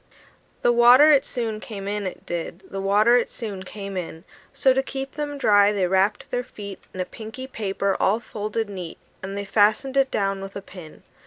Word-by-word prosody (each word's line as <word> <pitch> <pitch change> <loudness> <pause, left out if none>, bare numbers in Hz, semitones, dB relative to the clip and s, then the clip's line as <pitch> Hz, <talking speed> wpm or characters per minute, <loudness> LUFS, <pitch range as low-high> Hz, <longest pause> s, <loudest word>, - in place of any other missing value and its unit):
The 240 - +5
water 245 +5 +7
it 280 -2 +5
soon 225 -4 -3
came 200 -3 -7
in, 205 -1 -2
it 185 - -8
did; 175 +2 -5
The 195 - -5
water 210 +5 +4
it 245 - 0
soon 205 -5 -6
came 195 +1 -7
in: 165 -2 -5 0.3
So, 275 -1 +3
to 265 - +2
keep 270 0 -5
them 290 -1 -4
dry, 205 -6 +5
they 200 -3 +1
wrapped 190 +3 +1
their 245 0 -1
feet 200 -4 -9
In 185 - -9
a 185 - 0
pinky 225 +5 -8
paper 200 -5 -2
all 210 +4 +2
folded 215 0 -4
neat; 185 -5 -7 0.2
And 195 +1 -5
they 200 - -3
fastened 215 +7 +2
it 270 -1 +3
down 195 -3 -1
with 195 0 -8
a 200 - -5
pin. 175 -5 -12
205 Hz, 200 wpm, -24 LUFS, 195-240 Hz, 0.3 s, water